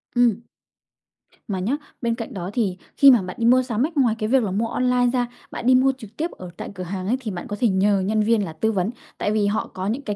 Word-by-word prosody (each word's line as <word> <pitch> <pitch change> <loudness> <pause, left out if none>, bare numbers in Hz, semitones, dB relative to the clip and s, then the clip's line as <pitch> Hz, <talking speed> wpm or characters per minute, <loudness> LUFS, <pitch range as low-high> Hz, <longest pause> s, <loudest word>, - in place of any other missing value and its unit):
Ừm. 235 -3 +3 1.1
Mà 190 -3 -2
nhá, 235 +10 0 0.2
bên 235 -2 0
cạnh 230 +1 -6
đó 180 -1 -4
thì 200 -6 0 0.2
khi 275 -1 +9
mà 235 -5 +5
bạn 185 -1 -6
đi 230 - +1
mua 255 +2 +6
sắm 240 +1 0
ấy, 325 - -4
ngoài 245 -6 +3
cái 215 0 -1
việc 260 -2 +4
là 195 - -2
mua 220 +4 0
online 250 0 +2
ra, 245 -1 +1 0.2
bạn - - -6
đi 255 +1 +6
mua 265 +1 +4
trực 220 -3 -13
tiếp 330 +3 -2
ở 180 -1 -9
tại - - -6
cửa 185 - -5
hàng 185 +1 -4
ấy, 250 +4 +1
thì 225 -5 -5
bạn 175 - -6
có 205 - -4
thể 240 - +3
nhờ 195 +1 +2
nhân 215 +3 +1
viên 220 -2 +2
là 160 - -7
tư 220 +8 0
vấn. 190 -1 0 0.3
Tại 205 - -1
vì 210 -1 +2
họ 210 - -1
có 185 +1 -4
những 235 +6 -1
cái 210 -7 -4
220 Hz, 280 wpm, -23 LUFS, 195-245 Hz, 1.1 s, khi